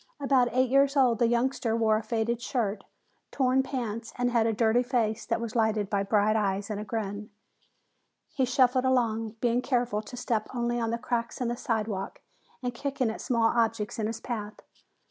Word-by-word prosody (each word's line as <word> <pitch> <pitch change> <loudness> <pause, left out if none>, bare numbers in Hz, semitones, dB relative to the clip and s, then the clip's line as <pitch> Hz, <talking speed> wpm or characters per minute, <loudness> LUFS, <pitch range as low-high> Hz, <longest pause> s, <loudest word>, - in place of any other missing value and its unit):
About 265 -3 +3
eight 255 0 +2
years 275 +1 +4
old, 245 -4 +4
the 235 - +4
youngster 240 0 0
wore 220 -1 +3
a 215 - 0
faded 230 +1 -1
shirt, 220 -5 -2 0.4
torn 260 0 +2
pants, 230 -4 -4
and 245 0 +1
had 230 -2 +3
a - - +2
dirty 225 +2 +3
face 240 -4 -1
that 230 -1 0
was 230 0 -5
lighted 220 -3 +1
by 200 -1 +1
bright 210 +1 +2
eyes 200 -1 0
and 205 - -3
a - - -4
grin. 210 -1 -4 1.0
He 265 - +1
shuffled 255 +1 +3
along, 225 -4 +1
being 240 0 +2
careful 245 -5 0
to 235 +3 -10
step 225 -3 -1
only 240 0 0
on 230 -1 -1
the 230 - -1
cracks 235 -1 -3
in 245 -2 -1
the 240 - -1
sidewalk 220 -6 -3 0.4
and 245 -1 -2
kicking 265 -2 -1
at - - -7
small 230 -2 +2
objects 225 -2 0
in 215 - 0
his 225 0 -4
path. 215 -3 -5
230 Hz, 190 wpm, -28 LUFS, 220-245 Hz, 1.0 s, years